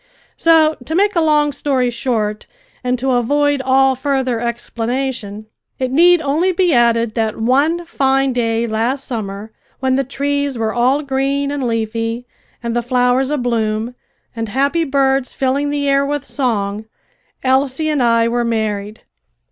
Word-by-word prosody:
So 320 -1 +4
to 320 - -3
make 405 +2 +2
a 335 - +3
long 300 -2 +3
story 270 -3 0
short 225 -4 -2 0.4
and 250 0 0
to 265 +2 -1
avoid 285 +3 +1
all 265 0 +3
further 260 -2 -1
explanation, 235 -2 -3 0.3
it 255 -1 -2
need 345 +3 +5
only 310 +7 +1
be 360 -2 +2
added 235 -2 +2
that 220 -2 -1
one 285 +9 +1
fine 270 -4 +1
day 230 -1 0
last 235 +5 -1
summer, 210 -2 -5 0.3
when 260 -1 +1
the 275 - +1
trees 280 0 -2
were 220 -1 -1
all 260 +5 +2
green 280 +1 -1
and 280 -3 -2
leafy, 230 +1 -2 0.4
and 235 0 -2
the 240 - +1
flowers 250 +2 +1
abloom, 235 -4 -1 0.4
and 225 -2 -4
happy 280 +8 +1
birds 270 -2 +1
filling 275 +2 0
the 285 -1 -1
air 275 0 +3
with 290 0 -3
song, 215 -7 -2 0.6
Elsie 265 +3 +1
and 300 -3 0
I 230 -1 +3
were 240 +1 0
married. 215 -2 -2
260 Hz, 150 wpm, -17 LUFS, 230-280 Hz, 0.6 s, need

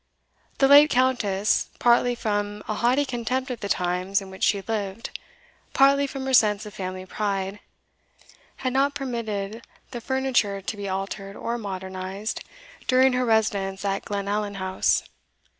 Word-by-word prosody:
The 270 - +5
late 290 +2 +8
Countess, 230 -7 +1
partly 240 0 +3
from 205 -2 -2
a - - -1
haughty 250 +6 +2
contempt 255 +1 -2
of 245 - -5
the 200 -3 -5
times 180 +2 0
in 195 -1 -10
which 190 - -11
she 200 -1 +3
lived, 215 -1 -3 0.6
partly 280 +1 +5
from 270 -1 -6
her 265 - -1
sense 210 -3 +4
of 210 - -9
family 185 0 -5
pride, 195 0 -2 1.0
had 255 -1 -3
not 280 +2 +2
permitted 230 -5 -4 0.3
the 240 - -6
furniture 255 -6 0
to 195 +3 -5
be 200 -1 -5
altered 195 +1 -4
or 235 +1 -3
modernized 190 0 -5 0.4
during 260 0 +5
her 250 0 +1
residence 205 -4 +1
at 195 0 -1
Glenallan 205 0 -2
House. 190 -1 +1
210 Hz, 145 wpm, -25 LUFS, 195-250 Hz, 1.0 s, late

